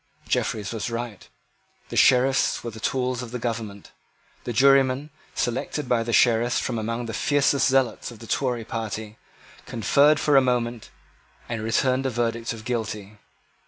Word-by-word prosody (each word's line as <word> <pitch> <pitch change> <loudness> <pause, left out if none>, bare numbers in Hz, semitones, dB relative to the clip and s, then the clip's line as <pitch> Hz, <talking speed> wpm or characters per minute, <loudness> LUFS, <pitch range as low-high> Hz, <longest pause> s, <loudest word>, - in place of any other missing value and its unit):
Jeffreys 105 -3 -1
was 115 +1 -3
right. 115 -3 -6 0.6
The - - -6
Sheriffs 130 +1 +3
were 120 - -4
the 110 - -10
tools 125 +1 -1
of 125 - -7
the 125 - -4
government. 110 -4 -5 0.5
The 120 - -2
jurymen, 135 +3 +3 0.2
selected 130 +3 -2
by 120 -2 +2
the 115 +1 -3
Sheriffs 120 0 +3
from 115 - -2
among 115 +2 -3
the 115 - -5
fiercest 140 +1 +2
zealots 130 -3 +1
of 120 - -11
the 115 - -11
Tory 120 -1 -1
party, 110 -1 -5 0.5
conferred 145 +6 +3
for 150 - +2
a - - +7
moment, 120 -2 -1 0.6
and 115 -2 -4
returned 130 +4 +1
a - - 0
verdict 115 -1 -2
of 110 -2 -8
Guilty. 105 -4 -4
120 Hz, 160 wpm, -24 LUFS, 115-130 Hz, 0.6 s, a